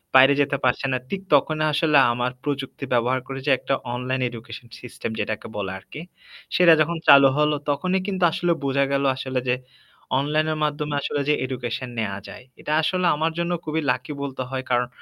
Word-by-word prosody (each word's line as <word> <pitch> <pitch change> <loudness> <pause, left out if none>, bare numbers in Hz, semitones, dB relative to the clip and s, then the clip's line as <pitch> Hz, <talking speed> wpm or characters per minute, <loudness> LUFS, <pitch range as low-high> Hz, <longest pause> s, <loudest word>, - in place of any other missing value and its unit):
বাইরে 135 +2 +8
যেতে 140 0 +1
পারছে 125 +2 +1
না। 130 - +1
ঠিক 195 -1 -3
তখনই 155 +2 +3
আসলে 150 -1 +3 0.2
আমার 125 +1 -1
প্রযুক্তি 140 -1 -4
ব্যবহার 125 +2 +2
করে, 135 0 -5
যে - - +4
একটা 135 - -2 0.2
অনলাইন 130 +1 -2
এডুকেশন 115 0 -10
সিস্টেম 120 -2 -6
যেটাকে 110 0 -3
বলে 95 -2 -3
আরকি। 120 +10 -10 0.5
সেটা 175 -2 +7
যখন 165 +2 0
চালু 140 -1 +9
হল। 150 0 +3 0.2
তখনই 185 +7 0
কিন্তু 190 -2 -2
আসলে 175 -1 0
বোঝা 140 0 +2
গেল, 140 0 +1
আসলে 130 -1 -3
যে 125 - +3 0.6
অনলাইনের 155 +2 0
মাধ্যমে 150 0 -2
আসলে 145 - -2
যে 150 - +5
এডুকেশন 125 -1 -4
নেয়া 100 -3 -2
যায়। - - -10 0.2
এটা - - -4
আসলে 185 +3 0
আমার 160 +2 0
জন্য 170 +1 -1
খুবই 160 +1 -1
লাকি 130 +4 -4
বলতে 135 -2 -5
হয়। 130 -1 -3
কারণ 125 0 +2
140 Hz, 185 wpm, -23 LUFS, 125-155 Hz, 0.6 s, চালু